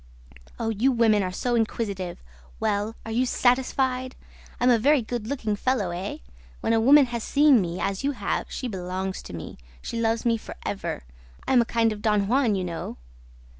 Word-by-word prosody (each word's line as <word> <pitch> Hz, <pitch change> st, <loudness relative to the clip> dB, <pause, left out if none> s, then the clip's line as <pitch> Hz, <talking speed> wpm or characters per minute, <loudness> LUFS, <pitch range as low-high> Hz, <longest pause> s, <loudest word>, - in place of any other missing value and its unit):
Oh, 225 Hz, -, -1 dB
you 225 Hz, +5 st, +2 dB
women 225 Hz, -4 st, +3 dB
are 185 Hz, -1 st, -2 dB
so 240 Hz, +6 st, -2 dB
inquisitive! 205 Hz, -6 st, -2 dB, 0.4 s
Well, 205 Hz, +2 st, -1 dB
are 225 Hz, -, -5 dB
you 250 Hz, +3 st, +1 dB
satisfied? 255 Hz, +1 st, +1 dB, 0.4 s
I'm 250 Hz, +1 st, +4 dB
a 235 Hz, -, +4 dB
very 280 Hz, +2 st, +4 dB
good 220 Hz, -1 st, -4 dB
looking 225 Hz, -6 st, -1 dB
fellow, 210 Hz, -5 st, 0 dB
eh?... 180 Hz, +3 st, -4 dB, 0.4 s
When -, -, 0 dB
a 225 Hz, -, +3 dB
woman 280 Hz, +4 st, +7 dB
has 235 Hz, -2 st, -2 dB
seen 285 Hz, -5 st, +5 dB
me, 175 Hz, 0 st, -3 dB
as 195 Hz, +3 st, -2 dB
you 285 Hz, +1 st, +1 dB
have, 205 Hz, -6 st, -2 dB
she 255 Hz, -, -4 dB
belongs 190 Hz, -2 st, -4 dB
to -, -, -10 dB
me. 80 Hz, -6 st, -8 dB, 0.2 s
She 230 Hz, -, -4 dB
loves 225 Hz, +1 st, 0 dB
me 230 Hz, -1 st, +3 dB
for -, -, -10 dB
ever. 200 Hz, -, -3 dB, 0.4 s
I -, -, +2 dB
am 245 Hz, -, +6 dB
a -, -, 0 dB
kind 225 Hz, -1 st, +1 dB
of 210 Hz, -, -9 dB
Don 210 Hz, -2 st, +2 dB
Juan, 245 Hz, -2 st, +2 dB
you 190 Hz, -, -1 dB
know!' 170 Hz, -2 st, -5 dB
225 Hz, 195 wpm, -25 LUFS, 200-250 Hz, 0.4 s, woman